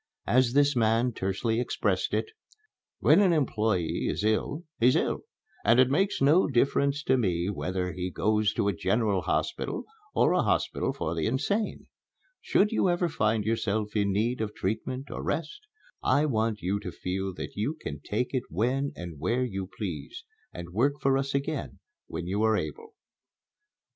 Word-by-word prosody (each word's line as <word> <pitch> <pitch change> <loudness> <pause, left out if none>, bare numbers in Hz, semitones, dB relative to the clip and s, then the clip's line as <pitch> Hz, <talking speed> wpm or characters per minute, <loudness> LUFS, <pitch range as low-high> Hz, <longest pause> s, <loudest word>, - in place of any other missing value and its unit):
As 125 -1 +3
this 145 0 +4
man 115 +1 +2
tersely 110 +4 -1
expressed 125 - 0
it: - - 0 0.8
"When - - +6
an 190 -3 +4
employé 110 - 0
is - - -2
ill, 110 +9 0 0.2
he's 125 +2 +5
ill, - - 0 0.4
and 115 +4 +5
it 130 0 +5
makes 190 0 +1
no 155 +7 +5
difference 140 +2 +1
to 130 -2 +3
me 90 -3 0
whether 90 -2 -2
he 90 0 -3
goes 105 +2 +1
to 100 - 0
a 100 - +2
general 100 0 +1
hospital - - -2 0.3
or - - +4
a 180 - +3
hospital 95 - 0
for 80 - -3
the 80 -2 -1
insane. 150 - -1 0.6
Should 210 +2 +2
you 205 -4 +2
ever 175 0 +1
find 110 -6 +1
yourself 110 -1 -1
in 100 -1 +2
need 115 +5 0
of 105 -1 -3
treatment 120 +7 -3
or - - -4
rest, 420 - -3 0.3
I 145 +2 +3
want 110 -5 0
you 95 +3 0
to 100 -3 -6
feel 95 +2 -3
that - - -6
you 125 +10 -2
can 75 - -6
take 125 - -2
it 130 -2 -1
when 125 - 0
and 85 -4 -8
where 120 - +1
you 95 -5 -4
please, 105 - -5 0.3
and 85 0 -8
work 130 +8 +3
for 135 0 +2
us 135 0 -1
again 140 0 -2 0.3
when 85 +1 -5
you 100 +4 -1
are 110 -1 +3
able." 450 - -6
115 Hz, 170 wpm, -28 LUFS, 100-140 Hz, 0.8 s, When